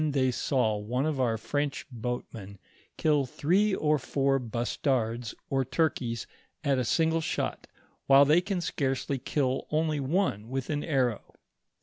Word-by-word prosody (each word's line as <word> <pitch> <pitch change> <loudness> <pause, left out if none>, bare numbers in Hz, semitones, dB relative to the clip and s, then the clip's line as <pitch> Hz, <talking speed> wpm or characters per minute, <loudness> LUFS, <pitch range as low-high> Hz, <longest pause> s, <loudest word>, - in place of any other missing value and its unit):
1 155 - +1
i - - 0
tlioy 130 -2 +2
saw 120 -4 +1
one 120 +7 -1
of 155 -3 -1
our 115 -3 +1
Fronch 145 +5 -2
boatmen 115 -4 -5 0.4
kill 150 -4 +2
three 190 +10 +2
or 150 -1 +2
four 135 +1 +1
bus 120 0 -3
tards 120 -4 -1
or 135 -1 +1
turkeys 120 -6 -1 0.4
at 140 -3 +2
a - - +1
single 160 +5 +2
shot, - - -3 0.4
while 140 +1 +8
they 155 +5 +5
can 190 -1 -2
scarcely 135 -3 -1
kill 130 0 -1
only 155 -1 0
one 135 - 0
with 135 +2 -3
an 145 -1 -1
arrow. 130 -7 -1
135 Hz, 155 wpm, -28 LUFS, 120-155 Hz, 0.4 s, while